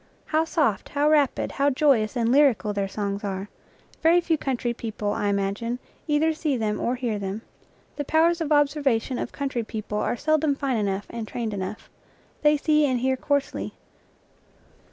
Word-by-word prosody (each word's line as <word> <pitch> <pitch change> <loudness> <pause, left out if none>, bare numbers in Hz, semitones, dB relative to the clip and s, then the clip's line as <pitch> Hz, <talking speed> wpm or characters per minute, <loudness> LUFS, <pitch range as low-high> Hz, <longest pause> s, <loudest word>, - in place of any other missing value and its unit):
How 315 +1 +1
soft, 295 - 0
how 290 +1 +1
rapid, 290 -4 +2
how 280 +1 +2
joyous 260 -5 +2
and 230 0 +2
lyrical 260 -7 +4
their 200 -1 -1
songs 200 +1 -3
are! 195 0 -4 0.5
Very 335 +2 +5
few 335 -2 +1
country 250 -5 -2
people, 215 -3 -3
I 205 - -1
imagine, 200 +4 -1 0.3
either 310 +1 +2
see 305 -4 -1
them 215 -2 -1
or 245 - 0
hear 240 -5 -2
them. 200 +3 -4 0.5
The 290 - -1
powers 330 +4 +2
of 310 -2 -2
observation 280 -5 +2
of - - -4
country 275 -4 -2
people 215 -1 -4
are 240 - -1
seldom 310 0 +2
fine 275 -3 -1
enough 200 -1 -1
and 230 -2 -5
trained 225 -2 -3
enough. 195 +2 -5 0.5
They 300 0 +4
see 300 +1 +3
and 255 -3 0
hear 260 +1 +2
coarsely. 285 +1 -2
250 Hz, 170 wpm, -25 LUFS, 215-295 Hz, 0.5 s, Very